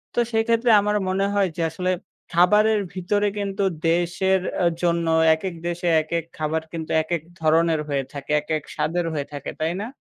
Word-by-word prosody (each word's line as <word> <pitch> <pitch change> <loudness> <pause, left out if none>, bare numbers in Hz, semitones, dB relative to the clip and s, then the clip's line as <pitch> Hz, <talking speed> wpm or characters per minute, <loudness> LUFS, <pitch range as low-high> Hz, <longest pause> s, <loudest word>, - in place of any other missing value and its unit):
তো - - +2
সেক্ষেত্রে 230 +1 +2
আমার 210 +1 0
মনে 195 +1 +1
হয় 200 -2 +2
যে - - -1
আসলে 180 +2 -1 0.4
খাবারের 210 +5 +4
ভিতরে 205 +3 0
কিন্তু 200 0 -2 0.3
দেশের 175 +2 +1 0.2
আ - - +3 0.2
জন্য 170 -1 +1 0.3
একেক 175 +1 -5
দেশে 175 +1 -3
একেক 165 +1 -2
খাবার 155 +1 -1
কিন্তু 160 -1 -5
একেক 170 -1 -2 0.2
ধরনের 160 0 +3
হয়ে 140 -1 0
থাকে। 140 +1 -6
একেক 155 -1 -2
স্বাদের 175 +2 -1
হয়ে 145 -2 -2
থাকে, 140 - -5
তাই 160 +2 0
না? 220 - -4
175 Hz, 170 wpm, -23 LUFS, 160-200 Hz, 0.4 s, খাবারের